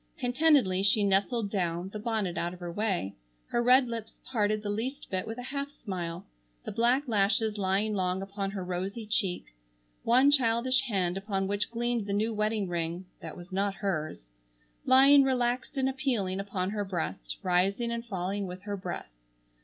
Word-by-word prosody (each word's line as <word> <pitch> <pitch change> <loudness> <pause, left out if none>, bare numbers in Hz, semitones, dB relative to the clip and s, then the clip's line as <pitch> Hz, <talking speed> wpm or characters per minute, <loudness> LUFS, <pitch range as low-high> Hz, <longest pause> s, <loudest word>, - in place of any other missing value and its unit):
Contentedly 250 -7 +3
she 205 +1 +4
nestled 200 +2 +1
down, 175 -2 -1
the 210 - -6
bonnet 210 -5 -1
out 175 +1 -2
of - - -16
her 175 -1 -5
way, 185 - -1 0.4
her 240 - +1
red 250 +2 +5
lips 230 -2 -6
parted 215 -3 +1
the 205 - -3
least 255 +7 -4
bit 185 -1 -2
with 225 +1 -5
a 245 - -6
half 280 0 -2
smile, 180 -10 -6 0.4
the - - -4
black 250 +5 +2
lashes 215 0 +2
lying 200 +3 +1
long 185 -2 0
upon 195 0 -4
her 195 -2 -5
rosy 190 +5 -4
cheek, 195 - -1 0.5
one 255 +5 +5
childish 255 -1 +3
hand 185 -5 0
upon 195 -1 -2
which 205 +1 -1
gleamed 235 -2 -1
the 200 - -1
new 220 +3 0
wedding 215 -1 0
ring—that 170 -1 -5
was 175 +2 -11
not 195 +1 0
hers,—lying 150 - +2
relaxed 255 0 0
and 265 -1 +2
appealing 245 -9 -1
upon 195 -1 -2
her 205 -1 -2
breast, 95 - -4
rising 195 +6 +1
and 235 0 -3
falling 195 -2 -3
with 180 +1 -8
her 205 0 -3
breath. 180 - -6
205 Hz, 170 wpm, -29 LUFS, 185-235 Hz, 0.5 s, red